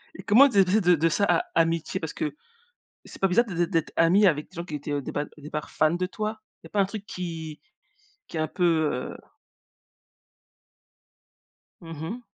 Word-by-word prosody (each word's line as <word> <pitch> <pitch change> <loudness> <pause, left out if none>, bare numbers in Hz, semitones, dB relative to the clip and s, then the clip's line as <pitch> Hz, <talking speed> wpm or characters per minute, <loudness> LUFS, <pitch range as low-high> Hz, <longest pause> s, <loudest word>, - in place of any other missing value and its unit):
Et - - -9
comment 255 +7 +6
tu 205 - -2
es 190 - +6
passé 200 +4 +2
de 180 -1 +5
de 165 +2 +2
ça 200 - +1
à 360 - +2
amitié? 165 +3 +1
Parce 160 - -5
que 315 -2 -3 0.7
c'est - - -12
pas 195 - +3
bizarre 210 +7 +4
d'ê 195 - -6
d'ê 175 0 +1
d'être 165 -3 -1
amie 185 +5 +5
avec 150 -4 +1
des - - -21
gens 170 - -4
qui 155 -4 -8
étaient, 145 +1 -5
heu, 145 - 0
au - - -2
départ 145 +2 -3
au - - -15
départ 150 +1 -6
fans 155 0 +2
de 180 +1 -1
toi? 215 +3 -4 0.2
Il - - -13
y - - -11
a - - -34
pas 205 - +1
un 195 - +3
truc 205 0 -7
qui 165 -5 -6 0.7
qui 165 - -7
est - - -1
un 155 - 0
peu, 180 - -1 0.3
heu 125 - -5 2.6
Mmh 165 -2 -8
mh. 225 +9 -5
175 Hz, 225 wpm, -26 LUFS, 160-200 Hz, 2.6 s, comment